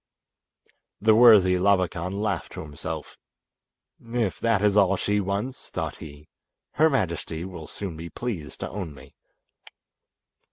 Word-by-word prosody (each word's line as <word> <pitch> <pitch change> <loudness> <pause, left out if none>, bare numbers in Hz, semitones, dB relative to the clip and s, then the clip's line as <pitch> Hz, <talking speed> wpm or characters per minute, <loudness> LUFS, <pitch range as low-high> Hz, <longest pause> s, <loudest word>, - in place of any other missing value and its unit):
The 110 +1 +5
worthy 105 -6 +7
Labakan 95 -2 +1
laughed 100 -5 -2
to 95 - -6
himself. 75 -3 -7 0.8
"If 115 -3 -2
that 115 -4 +1
is 105 -1 +3
all 100 -2 +4
she 105 +2 0
wants," 100 +7 -3
thought - - -4
he, 75 0 -11 0.4
"her 160 +2 +4
majesty 85 - -2
will 85 -5 -8
soon 95 -6 -6
be 85 +1 -7
pleased 95 -12 -6
to - - -3
own 90 -7 -5
me." 70 +1 -15
95 Hz, 130 wpm, -25 LUFS, 85-105 Hz, 0.8 s, worthy